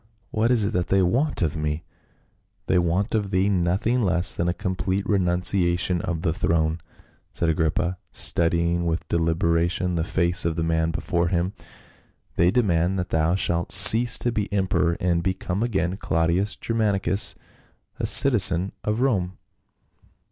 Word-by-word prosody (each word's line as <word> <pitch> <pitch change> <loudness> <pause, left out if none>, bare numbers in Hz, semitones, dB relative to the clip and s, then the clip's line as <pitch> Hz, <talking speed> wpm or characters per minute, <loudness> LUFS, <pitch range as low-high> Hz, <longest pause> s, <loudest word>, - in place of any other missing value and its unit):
What 110 +2 0
is 120 -5 +2
it - - -3
that 90 -1 -1
they 95 -1 +2
want 120 - 0
of 80 -2 -1
me 75 +1 -3 0.4
?" - - -45
"They 90 - +2
want 90 +4 -1
of 105 -3 -1
thee 95 +1 +1
nothing 100 +6 0
less 90 -4 0
than 85 - -2
a - - +1
complete 95 +2 -3
renunciation 90 -2 +1
of 85 -3 -4
the 80 - 0
throne," 80 -1 -1 0.5
said 85 - -1
Agrippa, 85 +3 -1
studying 85 0 0
with 80 +1 -3
deliberation 85 +2 0
the 85 -2 -1
face 90 -1 +1
of 85 -1 -1
the 85 - -2
man 80 0 0
before 85 +1 -2
him. 90 +2 -1 0.4
" - - -36
They 85 +1 +3
demand 95 -5 +1
that 90 -1 -3
thou 80 +2 +1
shalt 85 -3 -1
cease 115 +3 +7
to 120 - -2
be 105 -3 -3
emperor, 90 -4 0
and 85 -1 0
become 95 +2 -3
again 95 -6 -1
Claudius 85 +4 -1
Germanicus, 105 -3 0 0.6
a - - -2
citizen 95 -8 +4
of 105 +3 -2
Rome." 95 -9 -1
90 Hz, 155 wpm, -23 LUFS, 85-100 Hz, 0.6 s, cease